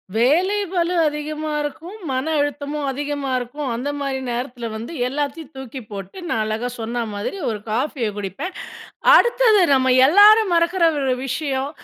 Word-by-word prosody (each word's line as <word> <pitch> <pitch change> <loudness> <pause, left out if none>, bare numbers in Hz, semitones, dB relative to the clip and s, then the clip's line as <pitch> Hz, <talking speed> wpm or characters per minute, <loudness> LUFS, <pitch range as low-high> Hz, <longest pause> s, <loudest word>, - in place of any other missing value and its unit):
வேலை 340 - +3
பளு 355 -1 0
அதிகமா 300 +1 -4
இருக்கும், 330 +7 -6
மன 260 0 -1 0.2
அழுத்தமும் 290 0 -2
அதிகமா 285 0 -3
இருக்கும், 270 +4 -5
அந்த 250 +5 -3
மாரி 275 -1 -2
நேரத்துல 240 -1 -4
வந்து, 230 +9 -6
எல்லாத்தையும் 290 +2 -4
தூக்கி 265 0 -7
போட்டு, 195 - -8
நான் 220 - 0
அழகா 220 +3 -2
சொன்ன 235 +1 -2
மாதிரி 205 - -4
ஒரு 215 -2 -3
காஃபிய 245 0 -1
குடிப்பேன். 205 - -5 0.6
அ, - - +9
அடுத்தது 475 -4 +4
நம்ம 260 -1 +3
எல்லாரும் 410 +3 +6
மறக்குற 340 +1 +2 0.2
ஒரு 260 -1 +1
விஷயம், 270 0 -2
285 Hz, 145 wpm, -21 LUFS, 245-330 Hz, 0.6 s, அ